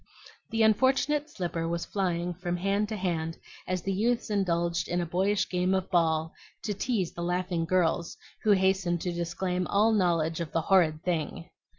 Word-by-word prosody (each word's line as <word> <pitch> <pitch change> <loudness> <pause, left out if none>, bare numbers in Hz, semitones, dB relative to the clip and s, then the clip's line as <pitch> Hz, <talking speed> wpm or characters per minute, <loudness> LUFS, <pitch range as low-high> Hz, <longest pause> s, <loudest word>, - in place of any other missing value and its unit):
The 225 0 +1
unfortunate 270 +7 +2
slipper 175 - -3
was 170 0 -2
flying 180 -3 -1
from 175 0 -3
hand 200 +3 0
to 220 - -3
hand 165 -4 -2 0.3
as 185 -1 -2
the 195 - -1
youths 230 +3 0
indulged 170 -3 0
in 175 - -1
a 175 - -1
boyish 190 +4 +1
game 180 +1 +1
of 190 -1 -2
ball 160 -2 +2 0.3
to 210 - -1
tease 205 -4 -1
the 170 - -6
laughing 175 -1 -1
girls, 170 -1 0 0.2
who 215 - 0
hastened 190 -2 +2
to 180 - -2
disclaim 175 +1 -2
all 210 +3 +3
knowledge 170 -6 +1
of 165 - -5
"the 165 - +2
horrid 160 -3 +3
thing." 170 0 -3
180 Hz, 175 wpm, -28 LUFS, 170-195 Hz, 0.3 s, all